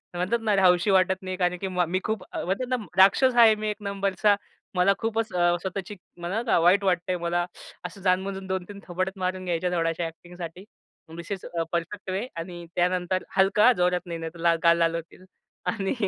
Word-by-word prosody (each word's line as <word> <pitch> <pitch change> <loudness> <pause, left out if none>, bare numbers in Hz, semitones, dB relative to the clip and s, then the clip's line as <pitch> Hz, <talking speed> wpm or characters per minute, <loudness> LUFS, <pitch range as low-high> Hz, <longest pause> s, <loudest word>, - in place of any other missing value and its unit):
म्हणतात 185 +7 0
ना, 215 -2 +2
"रहावं 185 -2 +6
असं 185 +3 0
वाटत 190 0 +3
नाही." 185 -1 -5
कारण 180 -1 +1
की 195 - -2
मा 180 -1 0
"मी 180 +3 -1
खूप" 220 0 -2
म्हणतात 195 +8 -2
ना, 255 - +2 0.2
"राक्षस 240 +7 +5
आहे. 230 -2 +7
मी 215 0 -3
एक 210 - -3
नंबरचा, 200 0 +1 0.4
मला 180 +2 +4
खूपच 225 0 -2
अ, 175 -1 +3
स्वतःची 190 +2 -5 0.3
मला, 215 +7 +1
वाईट 180 +4 +4
वाटतंय 180 -1 0
मला." 175 0 -1 0.4
असं 185 +2 -8
जाणून-बुजून 190 +1 0
2-3 190 +2 -4
थोबाडात 185 +2 -2
मारून 185 0 -2
घ्यायच्या, 175 0 0
थोड्याशा 165 0 0
acting 175 +2 -10 0.8
this 170 +3 -9
is 195 -2 -4
a, 170 -1 -2
perfect 175 +4 -3
way 195 +6 -2
आणि 175 +1 -7
त्यानंतर 180 +1 0
हलका 200 +5 +5
जोरात 180 0 +2
नाही 170 -2 -5
नाहीतर 165 +1 -7
ला 170 0 +3
गाल 170 0 +5
लाल 165 0 +2
होतील 170 +2 -8 0.4
आणि 195 -4 -1
185 Hz, 185 wpm, -26 LUFS, 175-195 Hz, 0.8 s, आहे